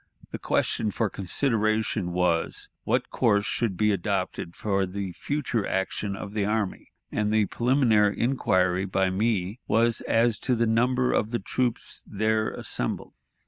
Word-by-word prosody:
The - - -5
question 110 - 0
for 105 0 -1
consideration 110 -2 0
was, 85 -2 0 0.2
What - - 0
course 100 0 +2
should 115 -5 -1
be 105 0 +3
adopted 95 -3 -2
for 100 -2 0
the 95 0 -4
future 130 - -2
action 95 +1 -2
of 100 +1 -7
the 105 -2 0
army? 105 -1 -2 0.2
and 105 0 0
the 110 -1 +3
preliminary 115 -4 +2
inquiry 95 -7 +1
by 95 0 +1
me 105 +1 0
was 115 +1 +2
as 115 0 +2
to 125 - 0
the 115 0 +2
number 125 +3 +2
of 110 - +1
the 120 - -1
troops 125 -1 -3
there 110 +1 0
assembled. - - -2
105 Hz, 145 wpm, -26 LUFS, 95-115 Hz, 0.2 s, be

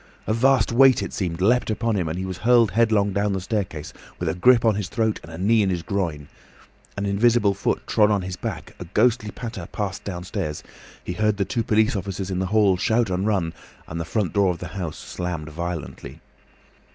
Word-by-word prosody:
A 110 - 0
vast 130 +3 +3
weight, 130 +2 +5
it - - -6
seemed, 90 -3 -3
leapt 120 +6 +3
upon 110 +1 0
him, 90 -5 -1
and 80 - -3
he 95 - -3
was 95 -1 -5
hurled 115 -1 +4
headlong 105 -2 +2
down 100 0 0
the 95 - -1
staircase, 95 -7 -4 0.2
with - - -3
a - - 0
grip 115 +6 +4
on 110 - +5
his 100 -2 -3
throat 110 -3 0
and 80 - -12
a 80 - -8
knee 110 +5 +3
in 100 - +2
his 90 -3 -2
groin. 80 -8 -2 0.7
An 100 - -2
invisible 105 +1 +3
foot 100 - -2
trod 105 -1 +3
on 100 -3 +1
his 90 0 -4
back, - - -6
a - - -6
ghostly 110 +4 +2
patter 110 -4 -7
passed 100 -3 -4
downstairs, 90 -5 -4 0.4
he 90 - -4
heard 105 +3 +1
the 100 - 0
two 120 - -1
police 110 0 +2
officers 95 0 -4
in 90 - -1
the 95 - -1
hall 100 -2 +3
shout 110 +1 +1
and 95 +3 0
run, 95 -6 0 0.3
and 85 - -5
the - - -1
front 95 +3 -2
door 100 -2 +3
of 90 - -1
the 85 0 -7
house 90 -5 -5
slammed 85 -3 -5
violently. 85 0 -6
100 Hz, 215 wpm, -23 LUFS, 90-110 Hz, 0.7 s, weight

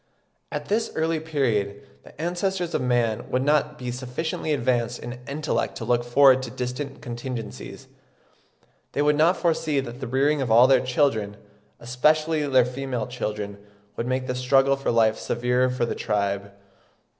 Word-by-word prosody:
At - - -4
this 220 +3 0
early 160 0 0
period 115 -11 -1 0.2
the - - -18
ancestors 175 +1 -2
of - - 0
man 120 -3 0
would 130 +1 0
not 150 +1 +1
be 125 -2 -4
sufficiently 130 +6 -4
advanced 120 -3 0
in 120 +1 -8
intellect 150 +2 -2
to - - -5
look 120 -1 +1
forward 130 +2 +5
to 130 - -5
distant 130 +3 -5
contingencies; 120 - -7 1.1
they 145 - +1
would 150 0 +3
not 165 +5 +3
foresee 160 -4 +1
that 120 -2 -6
the 130 - -5
rearing 140 +4 +2
of 130 - -2
all 115 +3 +7
their 135 0 +5
children, 125 -6 0 0.4
especially 155 +5 +1
their 130 -3 +4
female 125 -2 -3
children, 105 -4 -5 0.4
would 115 - -3
make 130 0 -1
the 125 - -2
struggle 135 +2 +3
for 135 - -3
life 110 -1 +3
severer 125 +2 +1
for 125 -1 -1
the - - -2
tribe. 100 -2 -2
130 Hz, 160 wpm, -24 LUFS, 120-145 Hz, 1.1 s, all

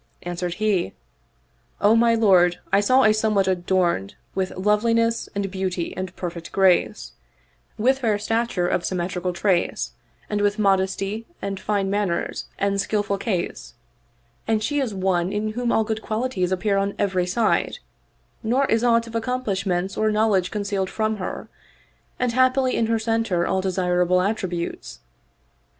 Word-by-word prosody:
An 175 0 -4
swered 175 0 -3
he, 205 -4 0 0.4
" - - -40
O 220 - +6
my 230 0 +4
lord, 185 -6 +4 0.2
I 200 - +6
saw 255 +6 +4
a 215 - +5
somewhat 215 -3 +1
adorned 175 - 0 0.2
with 190 -1 -1
loveliness 230 +3 +1
and 200 -1 -2
beauty 185 -3 -3
and 185 0 -5
perfect 170 -2 -6
grace, 190 -2 +2 0.7
with 260 +5 +2
fair 220 -5 +1
stature 225 -4 0
of 175 - 0
symmetrical 180 0 -2
trace 180 0 0 0.4
and 210 -1 -1
with 205 +1 +1
modesty 195 +2 0
and 195 -1 -4
fine 195 -1 -1
manners 200 -4 -1
and 200 0 +1
skillful 200 -2 -1
case; 170 - -3 0.7
and 220 -1 +1
she 290 +3 0
is 260 -5 -1
one 185 -2 0
in 210 +1 -1
whom 240 +1 -1
all 220 - +3
good 220 0 -3
qualities 215 -5 -1
appear 195 +2 +1
on 200 0 -1
every 185 -3 0
side, 215 +4 +1 0.6
nor 250 +5 +2
is 225 -2 +1
aught 230 -1 +3
of 230 - -11
accomplishments 200 -6 -1
or 215 0 +2
knowledge 210 -4 +2
concealed 200 -2 -2
from 220 -1 -1
her, 185 - -5 0.7
and 250 -1 0
haply 255 +1 +3
in 225 - +1
her 225 0 +2
center 220 -6 0
all 190 - 0
desirable 180 -1 +1
attributes. 185 - -3
200 Hz, 150 wpm, -23 LUFS, 185-225 Hz, 0.7 s, O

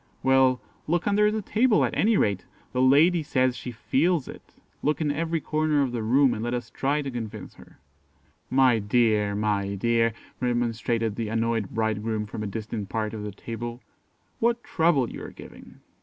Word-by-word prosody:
"Well, 130 -1 +4 0.3
look 175 +2 0
under 210 +1 +3
the 215 0 -2
table, 220 +3 +3
at - - -3
any 220 0 +3
rate; 100 -3 +1 0.3
the 125 - +1
lady 155 +7 +5
says 130 -4 +1
she 125 - -7
feels 145 +6 0
it; - - -12 0.3
look 150 +1 0
in 150 -2 0
every 165 +2 -1
corner 155 -1 +1
of 130 - -2
the 120 -2 -3
room, 130 +4 +3
and 110 - -4
let 120 +1 -1
us 120 -2 -5
try 145 +2 0
to 135 - -4
convince 115 -3 -6
her." - - -17 0.7
"My 130 -3 +4
dear, 105 -1 +2
my 100 -1 -1
dear!" 115 +2 +2 0.3
remonstrated 115 -2 -1
the 115 -2 -2
annoyed 115 -2 0
bridegroom 110 -1 -1
from 105 +1 -7
a 105 - -3
distant 105 0 -5
part 110 -1 -2
of 110 - -5
the 105 0 -5
table; 120 +4 -7 0.6
"what 235 +1 +1
trouble 160 -7 +2
you - - -8
are - - -7
giving." - - -14
120 Hz, 180 wpm, -26 LUFS, 110-150 Hz, 0.7 s, lady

